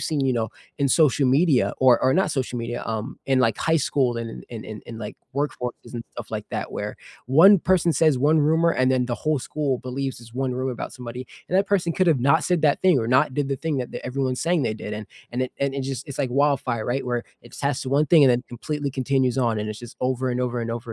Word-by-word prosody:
see, 155 - -1
you 130 - +2
know, 115 -3 -1 0.3
in 140 -1 +2
social 145 -1 +3
media 140 0 +3
or 125 -2 +5
or 130 - +3
not 185 -3 +2
social 130 -4 -2
media, 120 +1 -4
um, 110 +3 -4
in, 135 -1 +3
like, 115 -4 +2
high 160 0 +2
school 130 -4 +1
and 115 -1 -6
in 115 -3 -8
in 110 -1 -8
in 115 -1 -8
like, 105 -2 -7 0.2
workforces 130 -4 -4
and 115 -1 -5
stuff - - -8
like - - -4
that, - - -4
where, - - -4 0.3
1 170 - +7
person 175 -1 +2
says 155 -1 +3
1 150 +4 +3
rumor 160 +3 +3
and 130 -5 +2
then 130 -1 +2
the 120 - -2
whole 155 -1 0
school 135 0 -2
believes 130 +1 -4
this 115 -1 -14
1 130 -1 -1
rumor 130 +1 -2
about 120 - -6
somebody, 125 0 -7 0.2
and 185 - +2
that 200 - +2
person 185 -4 +1
could 185 +2 +1
have 150 -6 +3
not 140 +6 +3
said 175 -3 +1
that 145 -2 +3
thing 185 -4 +5
or 115 - -2
not 130 +1 +3
did 145 -2 -1
the 135 - -1
thing 155 0 -2
that 125 - -4
everyone's 130 0 -2
saying 170 -2 +1
they 110 -3 -1
did, 105 - -7
and 105 0 -6 0.4
it 130 - -3
and 140 0 0
it 140 - -2
just 130 -1 -5
it's 140 - -7
like 135 -3 0
wildfire, 130 -4 +1
right, 130 +3 -1
where 120 -1 -1 0.2
it 120 - -15
tests 140 -1 -2
1 140 +3 +2
thing 160 -3 +6
and 130 - +6
then 125 +1 +1
completely 145 +4 -4
continues 130 -1 0
on, 115 -4 +1
and 105 0 -3
it's 105 0 -6
just 120 -1 -11
over 130 0 0
and 125 0 -1
over 125 -1 -1
and 115 - -3
over 115 0 -5
130 Hz, 255 wpm, -24 LUFS, 120-150 Hz, 0.4 s, 1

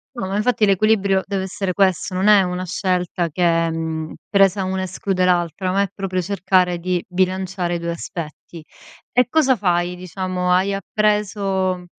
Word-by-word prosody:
No, 215 -6 -4
ma 195 +1 -3
infatti 220 +1 +2
l'equilibrio 200 -1 +2
deve 195 -1 -2
essere 190 -1 -3
questo. 190 -1 +1
Non 190 +3 +1
è 210 -2 +7
una 180 0 -3
scelta 180 -1 -1
che 165 0 +1
mhmm, 160 -1 -4
presa 195 -1 +3
1 190 0 -2
esclude 185 0 -1
l'altra, 180 0 +1
ma 195 +2 +2
è 200 - -1
proprio 190 -2 -2
cercare 185 -1 +1
di 180 0 -2
bilanciare 185 -1 -1
i - - -1
due 170 0 -3
aspetti. 165 -1 -7 0.5
E 250 0 +3
cosa 270 -2 +3
fai 180 -3 0
diciamo, 185 0 -3
hai 185 +2 +3
appreso 195 -3 0
185 Hz, 160 wpm, -20 LUFS, 180-195 Hz, 0.5 s, è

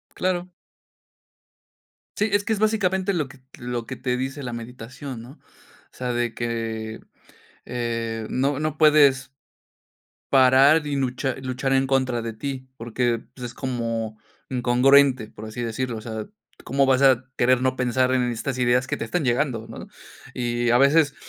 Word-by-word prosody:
Claro. 180 -1 -1 1.7
Sí, 210 +1 +1
es 205 0 +3
que 225 - -3
es 215 - +2
básicamente 200 -3 +1
lo 155 -6 -1
que 135 -1 -16 0.2
lo 120 -1 -4
que 130 - -6
te 125 0 -2
dice 135 +3 -4
la 125 -3 -5
meditación 125 +2 -8
¿no? 120 +3 -11
O - - -23 0.5
sea, 125 -1 -3
de 120 -1 -1
que, 115 -2 -4 0.6
eh, 115 -2 -3
no 140 +2 0
no 155 0 -2
puedes 140 -4 +5 1.0
parar 135 +4 +6
y 145 -1 -2
luchar 130 0 -2
luchar 130 +1 -2
en 135 0 +3
contra 130 -3 +1
de 115 -1 -5
ti, 130 +2 -5
porque, 120 0 -1
pues, 125 -2 -8
es 120 - -7
como 115 -4 -3 0.3
incongruente, 130 0 +4
por 110 - -10
así 110 +2 -6
decirlo. 120 +1 -3
O - - -11
sea 110 -1 -6 0.4
¿cómo 140 +1 +2
vas 135 0 +3
a 130 -2 +5
querer 125 +1 +3
no 130 0 +1
pensar 130 +1 +1
en 125 -1 +2
estas 120 +3 -3
ideas 125 +1 +3
que - - -2
te - - -4
están 160 +7 -1
llegando, 120 -2 0
¿no? 115 - -9 0.5
Y 120 -1 -1
a 120 - +5
veces 145 +2 +4
130 Hz, 165 wpm, -24 LUFS, 120-140 Hz, 1.7 s, parar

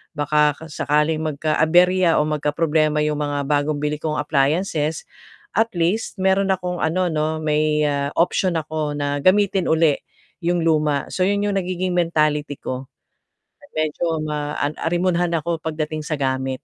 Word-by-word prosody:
baka 150 0 +2 0.2
sakaling 150 +2 +1
magka-aberya 165 +4 +3
o - - +3
magkaproblema 150 0 +1
'yong 150 -1 -1
mga 145 -1 -2
bagong 145 +1 0
bili 150 0 -1
kong 155 -1 -2
appliances, 150 +2 0 0.5
at 225 +3 +3
least 175 +6 0
meron 190 +1 +2
akong 180 -1 -4
ano 180 +2 0
'no, 155 0 -1
may, 150 0 +1
ah, 140 -1 0
option 180 +1 +1
ako 155 -2 -2
na 145 0 -1
gamitin 190 +2 +3
uli 160 -2 +3 0.4
'yong 175 -1 0
luma. 150 -3 +2
So, 185 0 +1
'yon 200 0 +1
'yong 200 -1 +1
nagiging 185 0 -2
mentality 155 -4 +1
ko, 130 0 -6 0.9
medyo 155 +1 -1
ma 150 -1 -3
an 145 +2 -1
arimunhan 175 0 +1
ako 165 0 -3
pagdating 155 -1 -3
sa 150 0 -3
gamit. 130 -1 -1
155 Hz, 145 wpm, -21 LUFS, 150-175 Hz, 0.9 s, magka-aberya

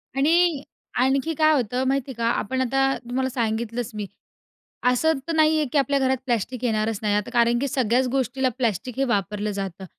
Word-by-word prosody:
आणि 320 +1 +3 0.4
आणखी 270 +5 +2
काय 310 0 +5
होतं 250 -1 0
माहिती 270 0 -1
का? 230 -1 -3
आपण 260 +2 -1
आता 270 +1 +1
तुम्हाला 260 +2 -2
सांगितलंच 230 0 -2
मी, 210 -1 -4 0.8
असं 320 +6 +2
तर 330 - -1
नाही 315 0 +4
आहे 305 - +1
की 295 - +1
आपल्या 275 0 +2
घरात 265 0 +2
प्लास्टिक 245 0 -2
येणारच 215 -2 0
नाही. 210 -1 +1
आता 210 - -1
कारण 235 -1 +3
की 280 - -1
सगळ्याच 255 -1 +1
गोष्टीला 265 0 0
प्लास्टिक 235 0 -2
हे 270 - +2
वापरलं 210 -3 -1
जातं. 195 -2 -5
255 Hz, 180 wpm, -24 LUFS, 225-270 Hz, 0.8 s, काय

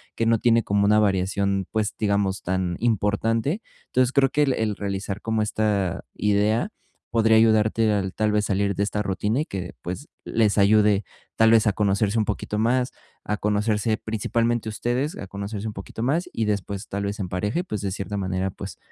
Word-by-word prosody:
que 115 - 0
no 115 0 +4
tiene 115 0 +4
como 100 0 +1
una 105 +1 +5
variación, 100 -1 +1
pues, 110 -2 -1
digamos, 100 -2 0
tan 90 -1 -1
importante. 115 - 0 0.3
Entonces, 130 0 +2
creo 135 -1 +3
que 150 +2 +2
el 135 - +2
el 110 -3 -1
realizar 100 0 -4
como 110 -1 0
esta 105 -4 0
idea 105 - +1 0.4
podría 110 -1 +4
ayudarte 110 0 +3
al 95 -2 -1
tal 110 -1 +1
vez, 105 0 +2
salir 100 0 0
de 100 - 0
esta 105 0 -1
rutina 105 +4 -1
y - - -2
que, 90 - -6
pues, 90 - -6 0.2
les 110 -2 +1
ayude, 105 0 +4 0.3
tal 110 0 +5
vez, 115 -1 +5
a - - +5
conocerse 100 +2 +1
un 110 - +1
poquito 105 0 -3
más, 125 +3 +1 0.3
a 105 - -2
conocerse 105 +2 +1
principalmente 115 +1 -1
ustedes, 120 +7 -2
a - - -6
conocerse 100 +2 -5
un 110 - -4
poquito 100 +3 -7
más, 170 +7 0
y 115 - -1
después, 100 0 -3
tal 100 0 -3
vez, 100 +2 -4
en 90 -3 -3
pareja 105 - -1
y, - - -8
pues, 105 - -4
de 100 -2 -2
cierta 100 +1 -4
manera, 95 0 -1
pues, - - -8
105 Hz, 195 wpm, -24 LUFS, 100-115 Hz, 0.4 s, una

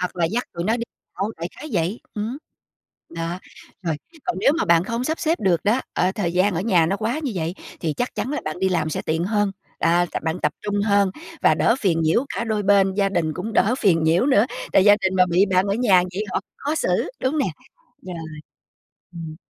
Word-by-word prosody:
hoặc 180 - -3
là 170 - +1
dắt 230 +9 -1
tụi 170 0 -4
nó 225 +3 +2
đi 235 - -4 0.4
đâu 210 +3 -1
đại 170 +2 -4
khái 310 - -7
vậy, 180 +4 -1
ừm, 220 +5 -3 0.7
đó, 170 +2 -4 0.4
rồi, 165 -4 -1 0.3
còn 360 - -1
nếu - - +4
mà - - +1
bạn 170 +1 +4
không 235 +3 -2
sắp 315 +3 -1
xếp 330 +1 0
được 180 -5 +1
đó, 225 +6 +3
ờ, 185 - +2
thời 180 -6 -2
gian 185 +1 +2
ở 165 - -1
nhà 185 -6 +3
nó 195 +4 0
quá 225 +8 -1
như 270 -6 -2
vậy 170 0 -2 0.3
thì 160 -3 -1
chắc 245 - -3
chắn 260 - -3
là 295 - -2
bạn 155 +2 -4
đi 190 - +3
làm 155 -4 0
sẽ - - -3
tiện 160 +2 -1
hơn, 205 -1 +1 0.3
à, 175 +1 +3 0.2
bạn 160 +1 -1
tập 150 - +2
trung 205 -1 -1
hơn 200 -2 +3 0.3
và - - +5
đỡ 230 - +3
phiền 170 -5 +2
nhiễu 165 - +2
cả - - -2
đôi 215 -2 -1
bên 195 -1 +4
gia 200 0 +2
đình 170 -5 0
cũng 215 +5 -4
đỡ 215 +4 +3
phiền 175 -9 +3
nhiễu 165 - +3
nữa, 245 -4 +4 0.3
tại 190 - +5
gia 205 0 +7
đình 190 -1 0
mà 185 -1 +5
bị 180 +3 +4
bạn 185 +1 +3
ở 200 - +1
nhà 205 -7 +4
vậy 210 +3 -2
họ - - 0 0.2
khó 295 +3 -2
xử, - - 0
đúng 275 +4 0
nè, - - +2 0.6
rồi, 180 -2 -7 1.0
ừm. 160 -2 -7
195 Hz, 235 wpm, -22 LUFS, 170-225 Hz, 1.0 s, gia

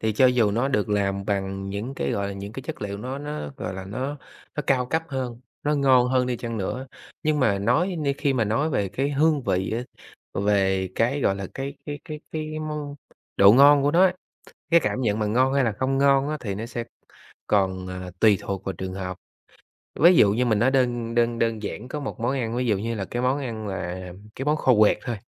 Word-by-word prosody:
Thì 110 -1 0
cho 130 +5 +5
dù 125 -4 +3
nó 120 +6 0
được 105 -6 0
làm 100 -1 0
bằng 95 -1 -2
những 110 +7 -4
cái, - - -2
gọi 100 0 -1
là, 100 - -4
những 100 +2 -7
cái 135 - -7
chất - - -6
liệu 100 0 -4
nó 130 +5 -5
nó, 145 - -5
gọi 95 - -5
là, 95 0 -6
nó 130 +9 -4 0.4
nó 150 - -1
cao 125 -2 +2
cấp 160 +6 0
hơn, 130 -4 -4 0.2
nó 150 +1 +1
ngon 130 -3 +4
hơn 130 0 +2
đi 125 -1 -1
chăng 115 -1 -5
nữa, 125 +7 -3 0.4
nhưng 155 -1 +1
mà 105 -6 +2
nói 155 - +1
nhưng 140 -3 0
khi 140 -3 +1
mà 125 -4 +1
nói 115 +10 0
về 100 -8 0
cái 135 +9 -1
hương 150 0 +2
vị 95 -5 -1
á, 120 - -2 0.5
về 95 -2 +1
cái, 130 +5 +1
gọi 95 - +2
là, 100 - -5
cái 135 +1 -4
cái 145 0 -4
cái 155 -1 -7
cái 155 0 -4
món 150 -2 -4 0.4
độ 100 +1 +8
ngon 140 +2 +7
của 145 - +3
nó 175 +4 +5
á, 185 -1 +3 0.6
cái 170 - +6
cảm 130 - -1
nhận 110 -3 0
mà 105 - 0
ngon 130 +5 +2
hay 140 -1 +3
là 115 - +1
không 130 +6 -1
ngon 140 0 +3
á 155 - -2
thì 100 -6 -4
nó 110 +3 -4
sẽ 120 0 -4 0.6
còn, 95 -2 +1
à, 90 0 -6
tùy 105 -3 +5
thuộc 95 -1 -4
vào 95 - -3
trường 95 +1 -5
hợp. 95 -1 -5 0.8
Ví 175 +3 +7
dụ 100 -10 +6
như 125 +4 +1
mình 110 -3 +2
nói 130 +3 +3
đơn 120 -3 0
đơn 120 0 +2
đơn 115 -2 0
giản 110 +3 -5
có 150 +3 -4
một 135 -2 -6
món 120 +3 0
ăn, 120 -4 -2
ví 125 +1 0
dụ 105 -5 +2
như 115 +3 -3
là 100 - -3
cái 120 - -3
món 130 +2 +2
ăn 115 -6 -5
là 90 -1 -5 0.2
cái 135 - -5
món 150 - +3
kho 130 -4 +3
quẹt 105 - +5
thôi, 120 -3 -4
120 Hz, 240 wpm, -24 LUFS, 100-140 Hz, 0.8 s, độ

